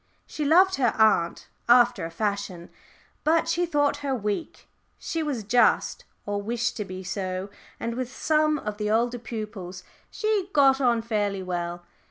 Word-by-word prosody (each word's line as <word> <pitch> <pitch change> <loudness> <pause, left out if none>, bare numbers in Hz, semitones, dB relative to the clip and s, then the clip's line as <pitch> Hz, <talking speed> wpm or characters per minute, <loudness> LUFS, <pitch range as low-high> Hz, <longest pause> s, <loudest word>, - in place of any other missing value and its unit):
She 305 - -5
loved 370 +6 +5
her 245 -4 +1
aunt 215 -6 +2 0.2
after 240 -5 +5
a - - -5
fashion, 200 -1 -3 0.5
but 325 +1 +2
she 345 +1 +1
thought 290 -3 +1
her 280 -2 -2
weak. 210 +5 -4 0.3
She 330 - -3
was 285 -8 -2
just, 240 +4 +2 0.2
or 205 0 -2
wished 235 +3 -2
to 210 - -3
be 185 0 -7
so, 185 0 -4 0.3
and 230 - -3
with 250 0 -4
some 305 +3 +1
of 210 -6 -5
the 210 0 -2
older 240 +3 +1
pupils 210 -5 -7 0.3
she 425 -3 -1
got 275 -1 +5
on 235 -3 +2
fairly 205 -4 -1
well. 175 -1 -4
230 Hz, 160 wpm, -26 LUFS, 200-280 Hz, 0.5 s, loved